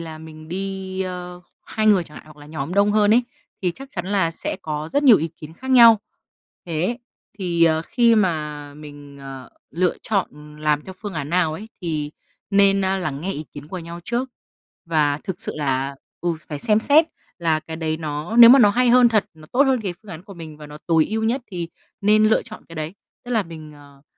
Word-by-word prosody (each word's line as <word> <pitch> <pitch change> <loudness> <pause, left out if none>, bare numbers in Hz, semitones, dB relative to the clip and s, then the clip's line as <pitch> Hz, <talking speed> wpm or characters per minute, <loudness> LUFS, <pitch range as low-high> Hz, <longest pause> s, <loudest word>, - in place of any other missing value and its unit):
là 160 -1 -8
mình 155 0 -12
đi, 190 +1 -4
ơ, 180 -1 -6 0.3
2 215 0 -1
người 195 -5 +5
chẳng 150 -2 -15
hạn - - -12
hoặc 155 -1 -15
là 145 0 -14
nhóm 155 +3 -5
đông 200 +1 +4
hơn 210 -1 +3
ấy, 245 - +4 0.4
thì 180 - +1
chắc 270 0 -11
chắn 175 -2 -5
là 190 -4 +1
sẽ 165 - -3
có 150 0 -4
rất 285 - +2
nhiều 255 -7 +8
ý 160 - -2
kiến 155 0 -10
khác 260 +10 -8
nhau. 230 -4 +8 0.7
Thế, 175 +9 -1 0.4
thì, 170 -3 +2
ờ, 160 -1 +2
khi 235 +4 +3
mà 150 -7 -1
mình, 145 -1 -12
ờ, 135 -2 -9 0.2
lựa 175 +3 0
chọn, 200 -4 0
ừm, 150 0 -14
làm 150 -1 0
theo 190 - -9
phương 205 -3 -6
án 145 -3 -4
nào 170 -3 +2
ấy 200 +8 -8
thì 155 -4 -3 0.4
nên, 195 0 +4
a, 190 +1 +1
lắng 150 -6 -3
nghe 195 +3 -3
ý 150 - -6
kiến 145 0 -10
của 185 - -5
nhau 170 0 -8
trước. 245 +2 -2 0.6
Và 150 -3 +1
thực 185 -2 -5
sự - - -3
là 135 -1 -1 0.2
ừ, 170 -1 -1
phải 150 -2 -5
xem 210 +7 +2
xét 300 +7 +5 0.3
là 160 -3 +1
cái 160 0 -8
đấy 160 -1 -2
nó 155 +6 -4
nếu 235 -1 +11
mà 270 - +8
nó 205 -4 +6
hay 250 +3 +2
hơn 245 0 +6
thật, 215 -3 +2
nó 155 -1 -15
tốt 265 +3 +5
hơn 265 -3 +2
cái 190 -5 -4
phương 210 - -12
án 160 +2 -9
của 200 - -11
mình 160 -3 -10
và 150 0 -11
nó 150 0 -11
tối 165 -2 +3
ưu 220 +1 -2
nhất 245 +4 0
thì 175 -3 -4 0.3
nên 215 +1 +4
lựa 220 - +3
chọn 220 -3 -12
cái 165 - -11
đấy. 155 +3 -4 0.3
Tức 245 - -9
là 225 -3 +2
mình, 160 -3 -11
ờ, 140 -1 -17
170 Hz, 230 wpm, -22 LUFS, 155-210 Hz, 0.7 s, nếu